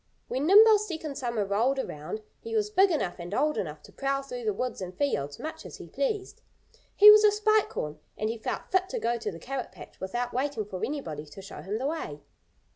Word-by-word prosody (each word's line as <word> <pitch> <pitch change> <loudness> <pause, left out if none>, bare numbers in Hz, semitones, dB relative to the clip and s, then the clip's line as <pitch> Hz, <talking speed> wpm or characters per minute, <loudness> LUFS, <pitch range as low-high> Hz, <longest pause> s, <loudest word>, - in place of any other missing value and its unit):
When 270 +4 -1
Nimble's 425 +2 +7
second 315 -5 -5
summer 235 -6 -1
rolled 225 +8 +1
around 215 - -5 0.2
he 455 0 -6
was 420 -1 +1
big 390 -1 +5
enough 295 - -1
and 175 +4 -5
old 300 +2 +2
enough 150 -5 -4
to - - -15
prowl 275 0 -1
through 250 -3 -7
the 215 - +2
woods 245 +2 -3
and 185 0 -7
fields 145 - -1
much 315 +1 -6
as - - -9
he - - -9
pleased. 425 -6 -3 0.5
He 420 +1 +11
was 425 0 +7
a 425 - +8
Spike 430 0 +2
Horn. 150 0 -4 0.2
And 215 - -1
he 225 +1 -3
felt - - -4
fit 375 0 +2
to - - -3
go 240 - 0
to 220 -2 -4
the 165 - -9
carrot 260 +9 -5
patch 170 -5 -13
without 240 +6 -3
waiting 260 -4 -1
for 190 -3 -6
anybody 160 - -4
to 150 +7 -11
show 195 - -9
him 200 +3 -3
the 255 - -3
way. 215 - -4
255 Hz, 225 wpm, -28 LUFS, -, 0.5 s, He